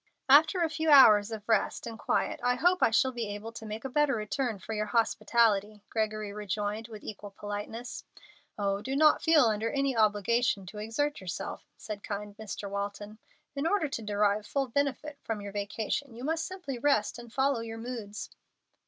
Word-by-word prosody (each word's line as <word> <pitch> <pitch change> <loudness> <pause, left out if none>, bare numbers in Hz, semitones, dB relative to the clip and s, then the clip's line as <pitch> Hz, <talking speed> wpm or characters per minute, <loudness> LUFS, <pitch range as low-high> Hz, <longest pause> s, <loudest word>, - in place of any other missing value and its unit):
"After 315 +6 +6
a 325 - +1
few 320 0 -1
hours 220 -8 +8
of 215 -2 -7
rest 220 -3 +1
and 225 -1 -7
quiet - - 0
I 245 0 +2
hope 355 +6 +2
I - - +5
shall 250 +3 +3
be 235 -3 -4
able 220 +2 -7
to 230 -1 -9
make 215 +4 -6
a - - 0
better 280 0 +2
return 220 +2 -2
for 220 - -7
your 215 0 -1
hospitality," 215 -2 +2
Gregory 215 -2 -2
rejoined, 210 +2 -3
with 215 -3 -10
equal 205 -1 -7
politeness. 205 +4 -6 0.5
"Oh, 200 -1 0
do 265 +4 -3
not 305 +1 +5
feel 320 -3 +5
under 220 0 +1
any 275 -1 0
obligation 215 0 +2
to 210 +3 -9
exert 230 +7 -2
yourself," 180 -2 -6
said 210 -2 -7
kind 205 0 -5
Mr. 215 -1 -6
Walton. 205 +2 -5 0.4
"In 280 +3 0
order 390 -4 +2
to 235 - -4
derive 210 0 +1
full 275 -2 -1
benefit 285 +2 -2
from 225 -2 -3
your 200 0 -7
vacation, 215 +6 -3
you 240 - -8
must 320 +3 -1
simply 355 -10 -6
rest 240 -5 +1
and 240 -1 -11
follow 270 0 +1
your 225 0 -6
moods." 225 -3 -6
225 Hz, 185 wpm, -29 LUFS, 210-270 Hz, 0.5 s, hours